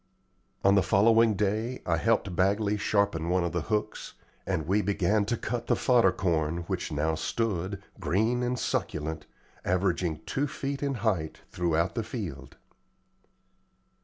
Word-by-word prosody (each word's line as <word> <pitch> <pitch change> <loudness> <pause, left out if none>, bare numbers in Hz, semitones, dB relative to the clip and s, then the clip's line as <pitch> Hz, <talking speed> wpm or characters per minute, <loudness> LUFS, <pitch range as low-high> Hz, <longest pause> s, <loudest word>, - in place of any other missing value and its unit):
On 100 - +5
the 100 - +5
following 110 +4 +4
day 110 +5 -1
I 85 -1 +1
helped 100 -1 +1
Bagley 100 +3 +2
sharpen 100 -5 0
one 90 0 +2
of 85 - -1
the 90 - -1
hooks, 105 +3 -3 0.3
and 90 -5 -1
we 100 +5 +2
began 100 +1 +1
to 120 +3 -1
cut 120 0 -4
the - - +3
fodder 120 -7 +4
corn 85 -2 -1
which - - -3
now 75 +2 0
stood, 100 +2 -2 0.2
green 110 +6 +1
and 125 0 -1
succulent, 80 -7 -3 0.4
averaging 90 -3 0
two 145 +2 -1
feet 140 0 -4
in 140 -2 -1
height 85 -8 -1
throughout 85 0 0
the 115 - -1
field. 85 - -7
100 Hz, 145 wpm, -28 LUFS, 85-110 Hz, 0.4 s, On